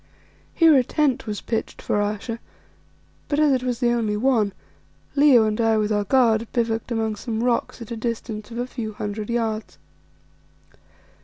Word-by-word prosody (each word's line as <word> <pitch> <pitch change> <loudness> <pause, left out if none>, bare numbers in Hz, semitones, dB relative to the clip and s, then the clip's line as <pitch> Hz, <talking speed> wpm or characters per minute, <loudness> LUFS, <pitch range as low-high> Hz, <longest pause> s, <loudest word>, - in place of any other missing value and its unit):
Here 325 -3 +6
a 260 - +5
tent 280 -2 0
was 210 -1 -3
pitched 225 -2 -3
for 205 - 0
Ayesha, 210 +3 -3 0.9
but 290 - -1
as 305 -2 +4
it 260 -2 +2
was 250 -2 -2
the 240 -2 +2
only 220 -3 0
one, 225 -4 +2 0.6
Leo 280 -6 +6
and 215 +1 0
I 225 -1 +3
with 215 0 0
our 205 -1 +1
guard 230 -2 +3
bivouacked 230 0 -1
among 220 -2 -1
some 225 +1 -3
rocks 245 0 -1
at 230 - -13
a - - -2
distance 220 -1 -4
of 235 - -8
a 245 - -1
few 230 -4 -5
hundred 210 +1 -5
yards. 225 -2 -2
230 Hz, 170 wpm, -23 LUFS, 215-245 Hz, 0.9 s, Here